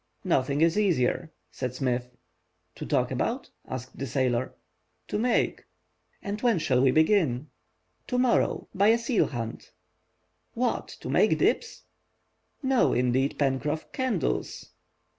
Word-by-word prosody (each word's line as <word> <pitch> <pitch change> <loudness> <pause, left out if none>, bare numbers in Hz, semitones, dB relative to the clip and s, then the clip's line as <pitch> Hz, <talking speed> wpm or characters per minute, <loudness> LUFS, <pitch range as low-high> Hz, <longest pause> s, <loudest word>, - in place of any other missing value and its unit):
"Nothing 140 +3 +1
is 165 +5 +3
easier," 165 -4 +1 0.2
said 125 -1 -4
Smith. 125 -2 -1 0.6
"To - - -7
talk - - +1
about?" - - -2 0.2
asked 130 0 -7
the 135 - -3
sailor. 130 -1 0 0.5
"To 210 - -1
make." 245 +2 +1 0.6
"And 205 +1 -4
when 235 -5 +3
shall 130 -5 +2
we 135 - +5
begin?" 155 - +2 0.6
"To 250 - -1
morrow, 250 -1 +2
by 200 +2 +3
a 225 +1 +6
seal 235 -1 +1
hunt." 115 -4 -6 0.8
"What! 245 +1 -1
to - - -6
make - - +4
dips?" 465 - 0 0.8
"No, 265 -2 +3
indeed, 125 +3 +1
Pencroff, 145 +2 -1
candles." 255 - -2
150 Hz, 125 wpm, -27 LUFS, 130-215 Hz, 0.8 s, a